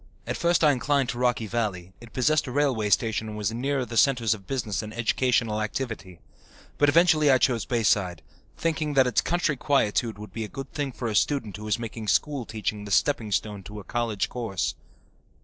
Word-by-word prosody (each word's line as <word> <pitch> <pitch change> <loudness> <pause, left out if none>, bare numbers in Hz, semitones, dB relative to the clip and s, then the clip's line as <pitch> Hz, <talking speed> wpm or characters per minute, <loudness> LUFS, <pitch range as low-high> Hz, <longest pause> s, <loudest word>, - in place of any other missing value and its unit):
At - - -3
first 170 0 +2
I 150 - +7
inclined 135 0 +1
to 120 - -3
Rocky 120 -2 +1
Valley; 100 -5 -3
it 120 -1 -13
possessed 145 +3 +2
a - - -4
railway 125 -6 +1
station 110 +1 +1
and 105 - -6
was 105 0 -1
nearer 130 +3 -1
the 120 -1 -5
centres 120 -5 +4
of 100 -3 -10
business 110 -7 -2
and 105 -1 -7
educational 115 -2 +1
activity. 110 -5 -4 0.6
But 145 - +5
eventually 155 -1 +5
I 130 - +6
chose 120 -2 +1
Bayside, 100 -7 +1 0.3
thinking 155 -3 -1
that 135 -1 +6
its 125 - +2
country 170 -3 0
quietude 115 -5 +1
would 105 +1 -10
be 115 - -3
a - - -4
good 135 +3 -8
thing 145 -2 -2
for 120 -1 -5
a 110 - -2
student 115 -4 +1
who 105 - -8
was 105 - +1
making 115 -1 -6
school 135 - +1
teaching 105 -1 -3
the - - -7
stepping 110 +1 +2
stone 105 0 -1
to 105 +2 -9
a - - -9
college 115 -4 -1
course. 110 -7 -2
115 Hz, 200 wpm, -26 LUFS, 105-135 Hz, 0.6 s, I